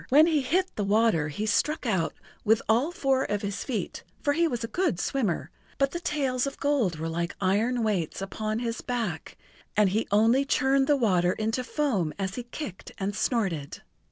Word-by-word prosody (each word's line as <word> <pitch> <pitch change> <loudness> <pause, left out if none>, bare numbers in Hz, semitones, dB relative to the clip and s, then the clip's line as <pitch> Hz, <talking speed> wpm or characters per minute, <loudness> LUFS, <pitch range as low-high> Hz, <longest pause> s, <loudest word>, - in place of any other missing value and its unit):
When 295 +4 +7
he 315 -3 +2
hit 365 +8 0
the 210 - -1
water 205 -6 +3
he 155 +8 -3
struck 300 +9 +1
out 190 -8 0 0.3
with 220 0 +3
all 245 +9 +3
four 270 -6 +1
of 205 -4 -2
his 200 0 -3
feet, 235 -5 -3 0.2
for 290 -3 +3
he 335 +3 +3
was 240 -6 -3
a - - -2
good 350 - 0
swimmer, 215 -10 -1 0.3
but 275 0 +2
the 345 - -3
tails 275 -6 0
of 275 - -6
gold 265 - +1
were 160 +1 -3
like 170 +1 -2
iron 220 +6 +1
weights 195 -8 -1
upon 215 +3 -3
his 230 0 -3
back, 225 -11 -3 0.4
and 210 -2 +5
he 215 +4 0
only 225 +6 +4
churned 270 -1 +2
the 290 - +4
water 185 -7 +2
into 225 +3 -1
foam 240 - -1
as 195 -1 -2
he 250 - -4
kicked 240 - -7
and 200 +1 -2
snorted. 190 - -1
225 Hz, 190 wpm, -27 LUFS, 195-270 Hz, 0.4 s, When